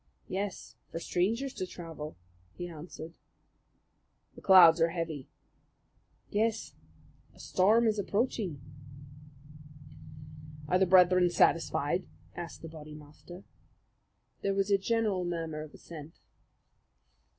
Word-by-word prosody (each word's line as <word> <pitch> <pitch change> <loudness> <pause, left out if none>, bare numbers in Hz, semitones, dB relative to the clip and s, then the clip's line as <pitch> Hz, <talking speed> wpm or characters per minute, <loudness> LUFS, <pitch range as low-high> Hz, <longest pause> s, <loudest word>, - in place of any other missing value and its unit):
"Yes, 195 +1 -5
for - - -5
strangers 225 +11 -1
to 185 - -4
travel," 160 - -8 0.4
he 175 - -6
answered. 165 0 -9 1.2
"The - - -14
clouds 175 -4 +8
are 165 - +4
heavy." 165 -5 -4 1.0
"Yes, 220 +1 0 0.6
a - - -19
storm 215 +5 +3
is 215 -2 +1
approaching." 200 - -1 2.1
"Are 180 +3 +2
the 190 - +3
brethren 180 0 +6
satisfied?" 170 0 +1 0.3
asked 170 -2 -8
the - - -6
Bodymaster. 155 +3 -12 1.0
There 195 0 0
was 195 +1 0
a 200 - +4
general 210 -3 0
murmur 165 -3 -3
of 155 -1 -9
assent. 160 -1 -11
175 Hz, 105 wpm, -30 LUFS, 165-195 Hz, 2.1 s, clouds